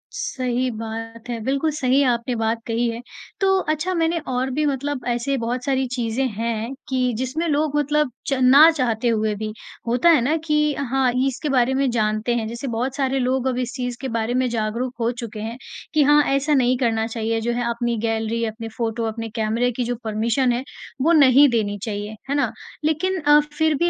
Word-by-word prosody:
सही 255 - -1
बात 225 +1 -7
है, 235 -1 -3
बिल्कुल 275 +5 0
सही 265 -1 +2
आपने 240 +1 -1
बात 225 +1 -1
कही 235 +1 0
है। 230 +1 -5 0.4
तो 385 0 +4
अच्छा, 315 +3 -1
मैंने 335 -1 +1
और 255 +1 -1
भी 300 +4 0
मतलब 280 -1 -2
ऐसे 245 +3 0
बहुत 240 +2 -2
सारी 265 -1 +1
चीज़ें 240 +2 -1
हैं, 230 +2 -3 0.2
कि 255 -2 +1
जिसमें 260 +7 -2
लोग 295 0 0
मतलब 295 -2 +1 0.2
च 275 - +1
ना 275 +5 +8
चाहते 245 -5 -1
हुए 220 -2 +1
भी 215 +1 -4 0.4
होता 245 +8 +3
है 310 -7 +6
ना 295 +6 +1
कि 300 -1 +2
हाँ, 265 -1 +1 0.2
इसके 280 +3 -3
बारे 260 -1 +2
में 270 0 +1
जानते 215 +1 0
हैं। 220 -2 -1
जैसे 235 +4 -5
बहुत 250 +3 -2
सारे 270 -1 0
लोग 255 +1 0
अभी 255 0 0
इस 245 - -4
चीज़ 245 -2 -3
के 270 - -3
बारे 230 +1 -1
में 255 0 +1
जागरूक 235 +3 -2
हो 230 +1 +1
चुके 230 -3 -7
हैं, 225 +3 -5 0.4
कि 305 -1 +4
हाँ 295 +1 +6
ऐसा 285 +2 +1
नहीं 255 -2 +3
करना 225 -3 +1
चाहिए, 225 0 -2
जो 235 +2 -1
है 245 +1 -1
अपनी 235 0 -1
गैलरी, 225 +1 -1
अपने 225 +1 -5
फ़ोटो, 230 0 -2
अपने 225 0 -4
कैमरे 230 +3 +1
की 245 +1 -2
जो 245 +1 -2
परमिशन 230 +4 +1
है, 240 +2 -1 0.4
वो 325 +5 +3
नहीं 280 -2 +7
देनी 210 -3 0
चाहिए। 210 -1 -4
है 280 - +1
ना? 285 - +1 0.3
लेकिन 370 +5 0
अ, 295 0 +6 0.2
फिर 315 -1 +3
भी 345 +4 +2
245 Hz, 205 wpm, -22 LUFS, 230-275 Hz, 0.4 s, ना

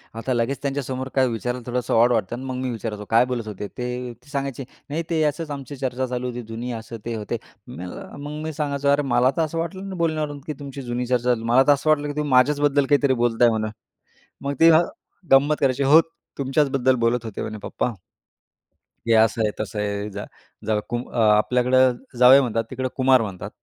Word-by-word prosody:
आता 115 +3 -2
लगेच 120 +3 -1
त्यांच्यासमोर 135 -2 -3
काय 130 -1 +4
विचारायला 125 +1 -3
थोडंसं 125 0 -2
ऑड 120 +2 +5
वाटतं 115 -1 0
ना - - -8
आणि - - -7
मग 125 - -4
मी 130 - -1
विचारायचो 105 -2 -5
काय 115 +2 +5
बोलत 125 -3 -4
होते. 105 -1 -5
ते 125 0 -5
ते 145 - -20
सांगायचे 140 -2 -3 0.3
नाही 160 +3 -2
ते 160 -2 +1
असंच 150 +1 -1
आमची 140 -1 -6
चर्चा 130 -1 -2
चालू 125 0 -3
होती 125 0 -5
जुनी 115 +2 -5
असं 115 0 -7
ते 115 -1 -3
होते. 105 -1 -3 0.3
मी - - -9
म्हणल 90 +1 -7 0.2
मग 150 +1 -6
मी 160 0 -4
सांगायचो 140 -2 -2
"अरे, 140 +1 +4
मला 130 -1 +2
तर - - +2
असं 160 +1 -2
वाटलं 180 +3 -3
नाही 190 - -6
बोलण्यावरून 155 -3 -1
की 155 - -2
तुमची 140 -1 -7
जुनी 125 0 -3
चर्चा 125 0 +1
असेल, 115 -2 -1
मला 120 +3 +4
तर - - +7
असं 145 +2 -2
वाटलं 150 -1 +3
की 145 - -4
तुम्ही 150 -1 -1
माझ्याचबद्दल 145 +2 +3
काहीतरी 140 -1 +3
बोलताय 120 0 +4
म्हणून." 110 -1 -1 0.8
मग 140 0 -1
तेव्हा 165 0 +7 0.5
गंमत 145 +3 +5
करायची, 135 -1 +1
"हो, 145 +4 +7 0.4
तुमच्याचबद्दल 135 -1 +2
बोलत 120 0 0
होते 110 -3 -5
म्हणे, 110 0 -5
पप्पा." 125 - -2 1.2
"हे 115 - +4
असं 110 0 +4
आहे, 105 -1 +1
तसं 105 0 -5
आहे. 100 0 -2
जा 100 +1 -6 0.4
जावई 110 -1 +2
कुम 120 +1 -3
आपल्याकडं 125 +4 +4 0.2
जावई 125 +2 +8
म्हणतात, 115 -3 -1
तिकडं 130 0 -3
कुमार 130 -1 +4
म्हणतात, 100 -5 -5
125 Hz, 205 wpm, -23 LUFS, 115-140 Hz, 1.2 s, जावई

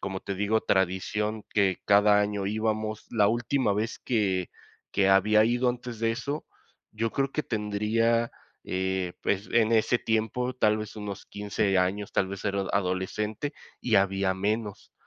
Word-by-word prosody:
como 95 0 -4
te 100 - -4
digo, 105 +3 +1
tradición 105 +3 0
que 100 -3 +1
cada 105 0 +5
año 100 -1 -1
íbamos, 110 0 -2
la 105 -3 +3
última 120 0 +1
vez 110 +2 -2
que 95 -6 0 0.5
que 95 -1 +3
había 105 +3 +5
ido 120 +2 +2
antes 120 -2 -7
de 115 0 +2
eso, 140 +5 -4 0.5
yo 115 +1 -1
creo 135 0 0
que 155 - -1
tendría, 110 +2 0 0.3
eh, 95 -1 -2
pues, 100 +1 -1
en 115 -1 +3
ese 115 +2 +3
tiempo, 115 +3 -1
tal 105 -4 +3
vez, 110 0 -7
unos 105 -2 -6
15 100 -1 0
años, 100 +2 -1
tal 95 - +1
vez 100 -1 -7
era 100 -1 0
adolescente, 100 +8 -2 0.3
y 120 - 0
había 95 -1 +2
menos 105 +1 -3
105 Hz, 155 wpm, -27 LUFS, 100-115 Hz, 0.5 s, cada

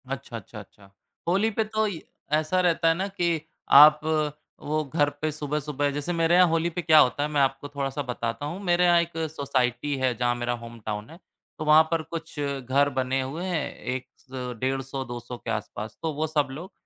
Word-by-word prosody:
अच्छा, - - -5
अच्छा, - - -10
अच्छा। 100 -1 -16 0.4
होली 195 +6 +3
पे 220 +1 0
तो 215 0 -1
इ 185 -6 -4 0.3
ऐसा 155 +4 +2
रहता 170 -2 +2
है 165 - +5
ना 190 +3 -2
कि 170 -5 -1 0.4
आप 150 +1 +9 0.6
वो 155 +1 0
घर 145 -3 +4
पे 155 0 0
सुबह-सुबह 150 -1 -2
जैसे 145 +5 -3
मेरे 165 0 +3
यहाँ 180 0 +7
होली 165 +1 +1
पे 175 +1 -4
क्या 160 -2 +6
होता 145 +1 +3
है, 150 - -1
मैं 150 -2 +1
आपको 135 +1 0
थोड़ा-सा 140 0 -3
बताता 115 +2 -3
हूँ। 170 +6 -5
मेरे 175 -1 +3
यहाँ 175 -1 +5
एक 170 0 -4 0.2
सोसाइटी 140 -1 -1
है, 130 -1 +3
जहाँ 120 -1 +1
मेरा 120 0 -2
होम 115 0 -10
टाउन 105 0 -4
है। 165 - -12 0.4
तो 155 - -3
वहाँ 155 +1 +7
पर 165 -1 +1
कुछ 165 -2 -6
घर 140 0 +1
बने 130 +1 0
हुए 145 +7 -4
हैं, 170 -6 -2
एक 130 +1 -4
स 125 -2 -7
150-200 130 -2 -3
के 120 - -5
आसपास, 110 0 -5
तो 160 -1 -1
वो 155 +2 -1
सब 150 -2 +1
लोग 170 +8 -8
145 Hz, 205 wpm, -26 LUFS, 130-165 Hz, 0.6 s, आप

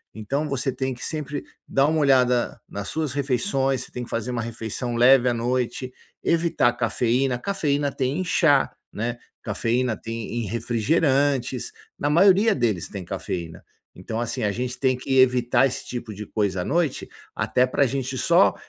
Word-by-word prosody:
Então 140 +8 -2
você 135 -1 -1
tem 130 0 -2
que 125 - -7
sempre 150 -2 -4 0.2
dar 135 +1 +3
uma 160 0 +1
olhada 125 -4 +3
nas 100 0 -5
suas 155 -5 -2
refeições, 135 -1 0
você - - -14
tem 125 - -5
que - - -16
fazer 115 +2 -2
uma 120 - -2
refeição 115 +1 -4
leve 125 +1 +6
à 120 - +1
noite, 125 +1 -2 0.3
evitar 165 -7 +2
cafeína, 125 +2 0
cafeína 145 -6 0
tem 135 +6 -1
em - - 0
chá, 145 -5 +3 0.2
né. 120 +3 -3 0.3
Cafeína 120 0 0
tem 115 +1 -4
em - - -4
refrigerantes, 135 - +1 0.3
na 145 - 0
maioria 195 +6 +5
deles 110 -9 0
tem 95 -3 -7
cafeína. 85 -1 -5 0.3
Então 110 +5 -5
assim, 120 -1 -3
a 105 - +1
gente 125 +4 -4
tem 130 -2 +2
que 135 +1 +1
evitar 125 0 +4
esse 130 - -6
tipo 120 -3 -6
de 105 +1 -7
coisa 100 -4 -1
à - - -4
noite 165 -2 0 0.3
até 125 - +2
pra 140 +2 +2
gente 130 0 -3
só 170 +8 +4
125 Hz, 170 wpm, -24 LUFS, 115-140 Hz, 0.3 s, leve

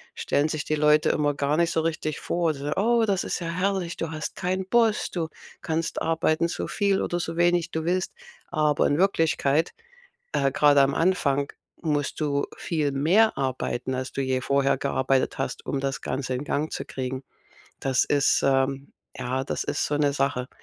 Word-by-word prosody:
stellen 145 +2 +1
sich 155 -2 -2
die 155 - 0
Leute 150 0 +4
immer 145 -1 +1
gar 145 +2 0
nicht 170 0 +2
so 160 - +1
richtig 155 -2 -2
vor. 170 -2 0
So: 140 +1 -5
„Oh, 230 +3 +3
das 195 -3 0
ist - - -2
ja 170 - -3
herrlich. 180 0 -1
Du 165 - -3
hast 155 -1 -5
keinen 185 +1 -1
Boss. 225 -1 +2
Du 165 -3 -2 0.3
kannst 165 0 -2
arbeiten, 165 0 +1
so 170 - -4
viel 200 -2 +1
oder 175 - -1
so 165 -1 -4
wenig 175 -1 +2
du 160 - -2
willst.“ 185 +1 0 0.4
Aber 150 -3 +2
in 145 - +1
Wirklichkeit, 165 -4 +2 0.6
äh, 140 -2 +2
grade 145 -1 +5
am 135 0 +3
Anfang, 145 -6 +1 0.3
musst 150 -2 -1
du 140 -2 0
viel 155 -5 -1
mehr 180 +11 +3
arbeiten, 130 -1 -2
als 130 0 -3
du 135 - -2
je 130 -1 0
vorher 140 0 +1
gearbeitet 130 -1 0
hast, 135 - -4
um 140 - -1
das 135 0 -2
Ganze 130 -1 -3
in 125 - -3
Gang 150 +2 -2
zu - - -4
kriegen. 130 0 -4 0.6
Das 135 -2 +2
ist, 145 -1 +2
ähm 135 0 +1 0.2
ja, 130 +2 -2
das - - -3
ist - - -1
so 145 - -1
'ne 145 -1 +2
Sache. 135 -2 -1
150 Hz, 185 wpm, -25 LUFS, 140-170 Hz, 0.6 s, grade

